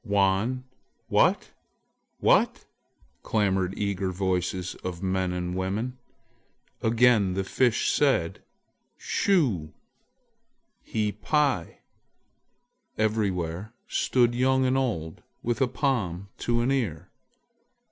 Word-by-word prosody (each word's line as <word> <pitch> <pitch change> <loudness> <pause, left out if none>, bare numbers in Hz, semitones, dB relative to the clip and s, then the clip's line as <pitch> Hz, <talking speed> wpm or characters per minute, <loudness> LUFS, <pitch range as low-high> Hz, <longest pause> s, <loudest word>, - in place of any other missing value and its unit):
"Wan! 100 +5 +1 0.5
what? - - +3 0.7
what?" - - +3 0.6
clamored 95 -3 0
eager 100 -2 -1
voices 90 -1 -1
of 90 0 -5
men 95 -1 0
and 90 0 -3
women. 105 +7 -2 0.8
Again 110 -4 +3
the 95 - 0
Fish 120 +4 +1
said: 135 - +1 0.6
"Shu... 125 - +1 1.2
hi 105 -2 0
pi!" 140 - 0 1.2
Everywhere 105 -2 -1
stood 120 -2 +2
young 130 +2 +2
and 130 +1 +2
old 85 -12 -2 0.2
with 120 +3 -1
a 130 - +4
palm 110 - -1
to 120 0 0
an 125 +3 +1
ear. 95 - -2
105 Hz, 95 wpm, -26 LUFS, 95-125 Hz, 1.2 s, a